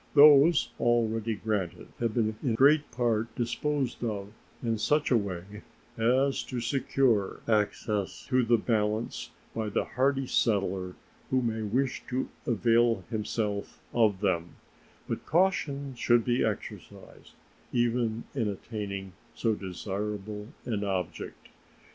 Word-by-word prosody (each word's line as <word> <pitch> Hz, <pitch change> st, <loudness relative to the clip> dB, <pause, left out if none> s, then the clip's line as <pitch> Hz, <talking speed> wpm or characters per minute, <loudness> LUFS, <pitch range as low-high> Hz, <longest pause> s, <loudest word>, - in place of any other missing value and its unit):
Those 145 Hz, +2 st, +7 dB
already 115 Hz, -2 st, +1 dB
granted 100 Hz, -5 st, -3 dB
have 115 Hz, -2 st, -1 dB
been 110 Hz, -2 st, +1 dB
in 120 Hz, -5 st, 0 dB
great 145 Hz, +4 st, +5 dB
part 115 Hz, -2 st, 0 dB
disposed 130 Hz, +2 st, -1 dB
of 105 Hz, -3 st, -3 dB, 0.3 s
in 115 Hz, -2 st, 0 dB
such 150 Hz, +6 st, +2 dB
a -, -, +6 dB
way 100 Hz, 0 st, -3 dB, 0.3 s
as 130 Hz, +4 st, +2 dB
to 125 Hz, -, -4 dB
secure 120 Hz, -4 st, +1 dB
access 105 Hz, -2 st, 0 dB
to 130 Hz, -1 st, +2 dB
the 120 Hz, 0 st, +4 dB
balance 110 Hz, 0 st, -1 dB, 0.2 s
by 110 Hz, -1 st, -2 dB
the -, -, 0 dB
hardy 135 Hz, +2 st, +1 dB
settler 95 Hz, -6 st, 0 dB, 0.3 s
who 130 Hz, -1 st, +2 dB
may 110 Hz, -1 st, -1 dB
wish 125 Hz, +5 st, 0 dB
to 130 Hz, +1 st, -2 dB, 0.2 s
avail 115 Hz, -2 st, +3 dB
himself 105 Hz, -2 st, -2 dB
of 105 Hz, -5 st, +3 dB
them, 85 Hz, -4 st, 0 dB, 0.5 s
but -, -, -4 dB
caution 145 Hz, -6 st, +1 dB
should 120 Hz, -1 st, +3 dB
be 120 Hz, 0 st, +2 dB
exercised -, -, -6 dB, 0.4 s
even 120 Hz, -1 st, +1 dB
in 120 Hz, -6 st, 0 dB
attaining 100 Hz, -2 st, -5 dB, 0.2 s
so 115 Hz, -2 st, +1 dB
desirable 105 Hz, +2 st, -4 dB, 0.2 s
an 105 Hz, -4 st, -1 dB
object. 95 Hz, -3 st, -4 dB
115 Hz, 125 wpm, -29 LUFS, 105-125 Hz, 0.5 s, Those